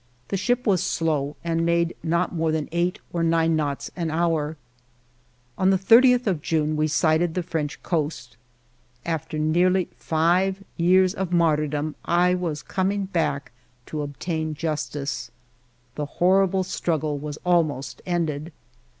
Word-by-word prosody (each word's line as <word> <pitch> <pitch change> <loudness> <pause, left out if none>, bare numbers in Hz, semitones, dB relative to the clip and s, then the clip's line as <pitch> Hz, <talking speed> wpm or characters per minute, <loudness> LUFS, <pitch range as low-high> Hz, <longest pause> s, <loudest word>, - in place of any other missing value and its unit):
The - - -1
ship 245 +6 0
was 190 -6 +3
slow 150 -3 -1
and 165 -1 0
made 170 0 +1
not 170 +2 0
more 160 -2 0
than 155 -1 -1
eight 175 +2 0 0.2
or 170 - -1
nine 165 0 +2
knots 145 -3 -2
an 170 -3 -2
hour. 160 -1 0 1.0
On 185 - +4
the 190 - +4
30th 245 +5 +5
of 185 -8 0
June, 155 -1 0
we 155 0 +1
sighted 160 +2 +2
the 180 - -1
French 160 -4 -4
coast. 150 -8 -2 0.7
After 160 -2 -3
nearly 175 +4 +2
five 180 +5 +1
years 185 +2 +4
of 190 -3 -3
martyrdom, 150 -3 +1
I 180 +1 +3
was 170 -5 -2
coming 195 +1 -1
back 160 -8 -1 0.3
to 155 - -4
obtain 155 +2 -3
justice. 145 -4 -3 0.6
The 150 +2 -4
horrible 190 +1 +3
struggle 155 -5 -2
was 150 0 -6
almost 155 -6 0
ended. 165 -3 -2
165 Hz, 140 wpm, -24 LUFS, 155-180 Hz, 1.0 s, 30th